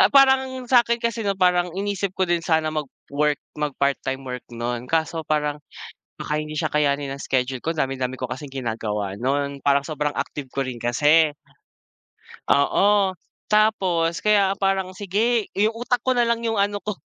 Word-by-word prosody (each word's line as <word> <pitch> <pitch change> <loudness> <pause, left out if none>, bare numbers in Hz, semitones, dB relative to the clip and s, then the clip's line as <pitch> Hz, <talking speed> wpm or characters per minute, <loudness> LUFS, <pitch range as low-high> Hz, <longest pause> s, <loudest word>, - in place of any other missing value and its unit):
parang 265 -1 +4
sa'kin 235 -2 +4
kasi 230 -1 -1
'no 200 -1 0
parang 180 -1 +3
inisip 200 -1 -2
ko 190 - +2
din 175 -1 +1
sana 160 -1 +1
mag-work 150 0 -2 0.2
mag-part 140 -2 0
time 135 0 -3
work 125 0 -5
non, 120 +1 -3
kaso 165 0 0
parang, 150 -1 -1 0.6
baka 150 - -2
hindi 155 0 -6
siya - - -1
kayanin 145 -2 +1
ng 140 - -6
schedule 130 -1 -1
ko 165 - -1
dami-dami 130 -3 -2
ko 125 -1 -5
kasing 135 +1 -7
ginagawa 105 -5 -3
non, 140 +2 -1
parang 140 0 +4
sobrang 150 -1 -2
active 140 -3 -4
ko 135 - 0
rin 125 -2 -6
kasi 150 +6 +3 1.2
Oo, 195 +6 +3 0.3
tapos 185 -6 +2
kaya 205 -2 +3
parang 195 -1 0
sige, 210 +4 0
'yung 210 +3 +3
utak 245 -1 0
ko 260 - +2
na 240 -2 +2
lang 235 0 0
yung 225 -3 0
ano 205 0 0
ko 210 - -2
160 Hz, 165 wpm, -23 LUFS, 140-205 Hz, 1.2 s, parang